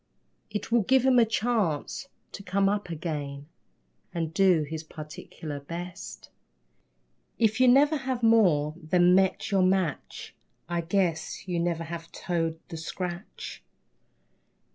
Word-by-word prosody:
It 210 +1 -5
will 235 0 +5
give 260 +5 +3
him 260 -2 +5
a 235 - +6
chance 225 - -1 0.2
to - - -8
come 195 +1 +1
up 205 -2 -1
again 150 -4 -4 0.7
And 165 -2 -2
do 185 -4 +4
his 155 +2 -5
particular 150 -1 -8
best. 170 +5 -8 1.1
If 220 +1 +2
you 255 - +6
never 285 +5 +5
have 260 -3 -3
more 180 -10 +4
than 175 +2 +4
met 190 +1 +2
your 195 -1 +3
match, 185 -5 -1 0.3
I 170 0 -1
guess 170 -1 -1
you 175 -2 -1
never 170 -1 -1
have 165 0 -7
toed 165 -3 -2
the 165 - -6
scratch. 175 +4 -6
180 Hz, 130 wpm, -27 LUFS, 160-210 Hz, 1.1 s, a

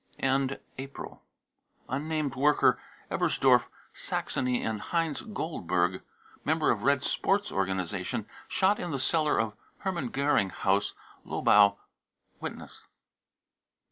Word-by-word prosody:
End 135 0 +1 0.2
April, 135 +1 -8 0.7
unnamed 150 +2 -1
worker, 145 +3 +4 0.3
Ebersdorf, - - +3 0.3
Saxony, 125 -1 -1
and 110 -2 -2
heinz 165 -3 -1
goldberg, 90 - -1 0.4
member - - +2
of - - -1
Red 140 -1 +3
Sports 200 +6 +1
organisation, 95 -2 -2 0.2
shot 195 +2 +2
in 175 - -3
the 140 - -1
cellar 155 +2 +2
of 110 -1 0 0.3
Hermann 175 -9 -2
Goering 140 -7 +2
House, 100 +2 0 0.3
Lobau. 100 -1 +4 0.6
(Witness.) - - -7
135 Hz, 105 wpm, -29 LUFS, 100-155 Hz, 0.7 s, worker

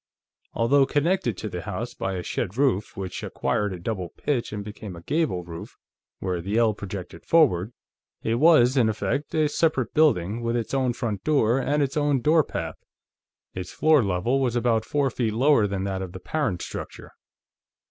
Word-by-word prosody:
Although 135 +4 +3
connected 145 - +1
to 110 - -4
the 90 -3 -5
house 110 +7 -5
by 95 0 -3
a 90 - -4
shed 95 +5 -3
roof, 130 -8 +1
which 95 -2 -5
acquired 105 -1 -1
a 90 - -5
double 90 -2 -3
pitch 130 - -2
and 105 -1 -5
became 105 -3 -8
a 85 - -11
gable 145 - 0
roof 85 -1 -9 0.4
where 90 -2 -2
the 100 +5 -2
ell 115 -2 +4
projected 100 -2 -8
forward, 120 - +3 0.5
it 115 +1 0
was, 145 -5 +6
in 115 -4 +4
effect, 125 +8 -2
a 155 -1 +3
separate 145 -4 0
building, 115 - +2
with 115 0 -1
its 115 +1 -3
own 130 -2 +1
front 110 -5 -3
door 135 -5 +3
and 145 +2 +1
its 140 +2 -2
own 145 -2 +2
door 155 +5 +4
path. - - -6 0.7
Its 90 0 -6
floor 155 -5 +4
level 100 +7 0
was 125 -3 0
about 120 -2 +1
four 140 -2 0
feet 115 -3 -1
lower 125 -2 +4
than 100 -1 -3
that 95 -1 -2
of 95 -2 -6
the 95 - -7
parent 140 - -2
structure. - - -8
115 Hz, 185 wpm, -25 LUFS, 95-140 Hz, 0.7 s, was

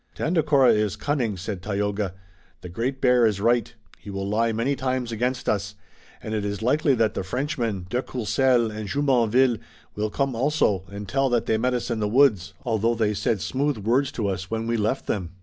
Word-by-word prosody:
"Tandakora 150 -5 +3
is 105 -2 0
cunning," 125 -9 -1
said 95 0 -5
Tayoga. 100 -1 -2 0.5
"The 90 - -8
Great 125 +9 -3
Bear 125 -2 +5
is 105 -3 -1
right. 115 +1 +2 0.3
He - - -11
will 100 0 -4
lie 115 +3 +1
many 115 +6 0
times 130 -2 -2
against 125 +3 -2
us, 100 0 -1 0.5
and 110 - -4
it 105 -2 -1
is 100 +1 -3
likely 140 +3 +3
that 110 -3 +1
the - - -3
Frenchmen, 115 - -2
de 125 +6 -1
Courcelles 125 -1 +1
and 105 -1 -5
Jumonville, 125 -2 +2 0.4
will 105 +1 -1
come 135 +4 -1
also 115 - +1
and 100 0 -7
tell 135 +7 +1
that 120 -2 +1
they 110 - +1
met 125 +2 +1
us 120 0 -3
in 115 - -1
the 105 - 0
woods, 105 -7 +3
although 115 0 +1
they 110 -2 +1
said 105 0 -1
smooth 140 - -1
words 125 +7 +1
to 110 -4 -2
us 95 -1 -3
when 115 0 -2
we 115 0 0
left 110 +4 -1
them." 90 -4 -3
115 Hz, 200 wpm, -24 LUFS, 105-130 Hz, 0.5 s, Bear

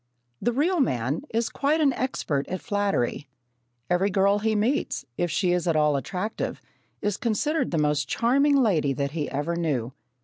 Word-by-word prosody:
The 240 - +1
real 320 +8 +1
man 130 - 0
is 230 +1 0
quite 295 +3 0
an 285 -4 +3
expert 160 - -2
at 185 - -3
flattery. 200 - -1 0.6
Every 180 +3 +2
girl 200 +1 +3
he 220 +1 0
meets, 225 - 0
if 175 - -1
she 175 +3 +1
is 180 0 0
at 165 - +2
all 150 -1 +3
attractive, 185 +9 -3 0.4
is 205 -1 0
considered 295 +8 0
the 170 - -1
most 150 -1 +1
charming 280 +5 +3
lady 185 - +2
that 140 +1 -2
he 150 -2 -3
ever 150 +5 -2
knew. 135 -8 -1
185 Hz, 170 wpm, -25 LUFS, 150-235 Hz, 0.6 s, an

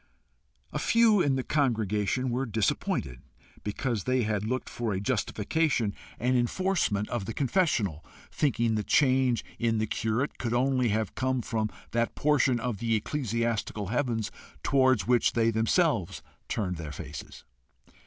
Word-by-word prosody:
A - - -1
few 225 -4 +4
in 140 -4 +2
the 130 - -1
congregation 120 -3 0
were 130 +2 -1
disappointed 100 - -1 0.4
because 110 0 -2
they 130 -1 +2
had 105 -2 -1
looked 130 +2 -2
for 115 -3 -3
a 95 - -1
justification 115 +2 0 0.2
and 125 +2 +1
enforcement 120 - +1
of 120 -5 -2
the 110 - -5
confessional, 130 - +1 0.3
thinking 120 -5 +1
the 105 -1 0
change 130 -3 +3
in 115 -1 +1
the 110 - +1
curate 110 +5 -1
could 120 -1 -1
only 130 -1 +2
have 110 0 -1
come 130 -1 -1
from 110 -2 -1 0.2
that 115 0 0
portion 140 -4 +2
of 115 -3 -3
the 115 -1 +1
ecclesiastical 115 -4 -2
heavens 120 -3 -1 0.3
towards 130 -6 +3
which 120 0 +3
they 115 -1 +3
themselves 110 - +1 0.3
turned 90 -5 -2
their 80 -2 -6
faces. 70 - -8
115 Hz, 145 wpm, -28 LUFS, 105-130 Hz, 0.4 s, few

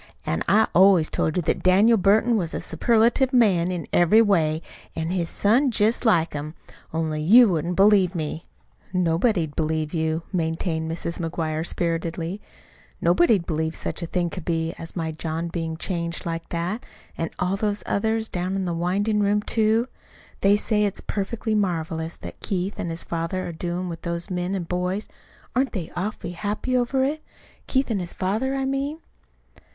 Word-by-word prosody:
An' 80 - -1
I 220 +2 +4
always 185 -3 +5
told 160 - 0
you 180 - +1
that - - 0
Daniel 200 +6 +5
Burton 215 +4 +3
was 175 -6 -1
a - - -2
superlative 235 - +2
man 195 -9 +3
in 175 -4 -3
every 175 +6 +5
way, 165 -6 +2 0.3
an' 160 +1 -2
his 175 -3 -1
son's 240 +4 +2
jest 220 +4 +2
like 170 -7 +3
him. 150 +2 -5 0.4
Only 155 -1 -2
you 225 +8 +7
wouldn't 170 0 -1
believe 195 -2 +4
me." 160 0 -4 0.5
"Nobody'd 175 -1 +1
believe 155 0 -1
you," 160 0 -1
maintained 160 -1 -1
Mrs. 170 +1 -3
McGuire 160 -2 -2
spiritedly. 170 +2 -2 0.6
"Nobody'd 225 - +3
believe 160 0 -2
such - - -4
a 170 - -3
thing 175 -1 -1
could 185 - -6
be 165 -1 -1
as 165 - -7
my 165 -2 -2
John 160 +1 -3
bein' 165 -1 -3
changed 170 -1 -3
like 165 -1 -4
that 175 +7 -3 0.3
an' 165 - -2
all 180 +2 0
those 205 0 -1
others 220 +2 0
down 180 0 -3
to - - -1
the 180 -2 -2
windin' 200 +5 0
room, 205 +1 +2
too. 225 +2 +2 0.5
They 200 +1 +4
say 210 0 +1
it's 205 -2 -1
perfectly 215 +2 -3
marvelous 165 -5 -1
what - - -9
Keith 190 +1 -2
an' 175 - -2
his 165 0 -3
father 165 +2 -3
are - - -4
doin' 175 +2 -3
with 165 -1 -6
those 170 +2 -3
men 180 +2 -1
an' 185 - -2
boys. 180 +4 -2 0.5
Aren't 260 +1 +1
they 180 -7 -4
awful 185 0 -3
happy 210 +7 -2
over 250 +2 +1
it 305 +3 -1 0.4
Keith 265 -2 +1
an' 210 - 0
his 175 -1 -5
father, 220 +8 -1
I 270 0 -1
mean?" 275 +3 -2
180 Hz, 175 wpm, -24 LUFS, 165-210 Hz, 0.6 s, you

